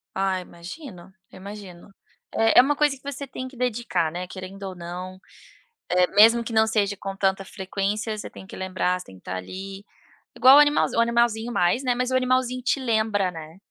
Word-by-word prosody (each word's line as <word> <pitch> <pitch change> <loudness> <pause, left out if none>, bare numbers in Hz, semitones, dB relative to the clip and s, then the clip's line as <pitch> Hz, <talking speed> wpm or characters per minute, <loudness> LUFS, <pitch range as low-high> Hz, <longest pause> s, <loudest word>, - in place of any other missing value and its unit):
Ah, 190 -1 0
imagino, 180 - -10 0.2
eu - - -13
imagino. 195 -2 -10 0.5
É 225 0 +5
é - - +12
uma 285 +3 +1
coisa 295 -1 +2
que 260 - -28
você 280 0 -6
tem 255 0 -6
que 260 - -13
dedicar, 230 -9 -1
né, 180 +2 -5
querendo 190 +2 -9
ou 190 -1 -6
não, 180 +2 -7 0.7
eh, 180 0 +3
mesmo 230 +3 +7
que 230 - -6
não 220 0 +4
seja 205 -2 +1
com 195 0 -5
tanta 195 0 0
frequência 200 +4 -3
você - - -7
tem - - -12
que - - -11
lembrar 185 -1 -1
você - - -10
tem 95 - -13
que 90 - -17
estar 90 - -5
ali, 195 - -8 0.5
igual 265 +2 +8
o - - +9
animalzinho, 295 -5 +3
o - - +6
animalzinho 235 0 +1
mais, 180 +5 +1
né, 250 -2 +1
mas 250 +1 -1
o - - +1
animalzinho 255 0 +1
te 250 +3 0
lembra, 220 -6 +1
né, 160 0 -10
205 Hz, 205 wpm, -24 LUFS, 185-245 Hz, 0.7 s, é